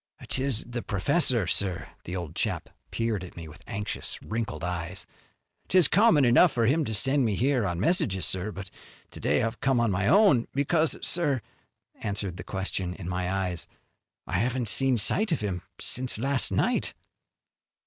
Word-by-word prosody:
"'Tis 130 -3 0
the 120 0 -4
professor, 120 - +1
sir." 90 -2 0 0.2
The 90 - -5
old 85 -4 -5
chap - - -2 0.2
peered 115 -4 -2
at 90 - -11
me 85 -1 -7
with 75 +3 -13
anxious, 105 +1 -3
wrinkled 110 -8 -4
eyes. 90 +1 -4 0.6
"'Tis 180 -5 +5
common 165 - +4
enough 125 +8 +6
for 115 -3 +1
him 150 +7 +2
to 110 - -2
send 135 +5 +3
me 110 -4 +1
here 125 -1 +1
on 85 -1 -3
messages, 105 - +1
sir, 95 +3 -2
but 95 -1 -9 0.4
to - - -9
day - - +1
I've 115 +1 -3
come 135 -2 +2
on 115 -3 +2
my 95 +1 0
own, 195 - +5
because, 155 +3 +1
sir," 145 -7 +2 0.6
answering 100 -3 -3
the 90 - -7
question 95 -2 -4
in 90 -5 -8
my 90 0 -2
eyes, 90 -3 -2 0.6
"I 90 - -1
haven't 120 0 0
seen 135 0 +3
sight 200 - +1
of 160 - 0
him 95 -4 -3 0.2
since 125 -2 +2
last 135 +2 0
night." - - 0
110 Hz, 170 wpm, -27 LUFS, 95-135 Hz, 0.6 s, enough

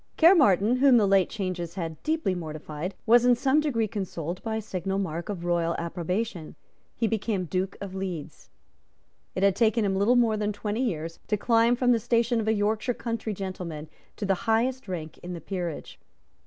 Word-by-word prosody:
Caermarthen, 255 - +5
whom 265 -1 +6
the 215 - +4
late 195 -1 +4
changes 185 -4 -4
had 165 -4 -5
deeply 315 -11 0
mortified, 155 +1 -5
was 235 +1 +6
in 245 0 +5
some 270 +4 +2
degree 245 -8 0
consoled 185 -4 -4
by 225 -1 -3
a 220 - -2
signal 195 -1 -3
mark 170 -1 -3
of 180 -4 -4
royal 170 -1 +1
approbation. 175 +1 -3 0.4
He 230 - 0
became 215 -3 -1
Duke 185 +3 -2
of 195 -2 -7
Leeds. 185 -6 -6 0.9
It 185 - -1
had 200 -2 +4
taken 225 0 +2
him 195 -1 0
little 205 +6 +3
more 230 -3 +3
than 210 0 -1
twenty 210 +3 -3
years 165 -7 -3
to 210 - +1
climb 230 +2 +3
from 245 0 +2
the 235 - +3
station 235 +1 +1
of 220 - -2
a 220 - +4
Yorkshire 220 +3 0
country 230 -3 -3
gentleman 180 -5 -6 0.3
to 210 - -4
the 195 - +3 0.2
highest 245 +2 +1
rank 165 -4 -6
in 180 +1 -7
the 170 - -5
peerage. 175 -5 -5
200 Hz, 185 wpm, -27 LUFS, 180-230 Hz, 0.9 s, whom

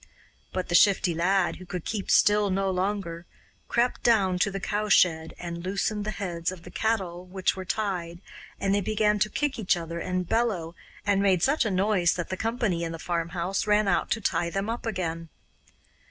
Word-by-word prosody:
But 185 - -3
the - - -2
Shifty 185 -1 +5
Lad, 180 +3 +1
who 185 - -11
could 180 -2 -5
keep 210 -4 -3
still 205 0 +4
no 195 0 0
longer, 185 -3 -2 0.4
crept 240 +1 +1
down 195 -6 +3
to 200 - +2
the 195 0 -4
cowshed 210 0 +4 0.3
and 170 -1 -6
loosened 200 +2 -1
the - - -2
heads 175 -3 -2
of 180 -2 -10
the - - -11
cattle 190 -6 -1
which 185 0 0
were 190 -1 -6
tied, 180 -5 -2 0.4
and 195 0 +1
they 200 - +2
began 210 +1 +1
to 215 - +2
kick 290 -1 -2
each 195 -4 +2
other 170 0 -5
and 180 0 -2
bellow, 195 -8 0 0.3
and 200 -1 +2
made 190 -3 +3
such 275 -1 +3
a - - +1
noise 190 -2 +2
that 175 -2 -4
the 190 - -2
company 225 -5 -1
in 165 0 -3
the - - -5
farmhouse 175 +4 -2
ran 210 0 +3
out 185 - +1
to 225 - 0
tie 170 -3 0
them 195 +5 -2
up 235 0 -5
again. 165 -5 -3
190 Hz, 195 wpm, -27 LUFS, 175-210 Hz, 0.4 s, Shifty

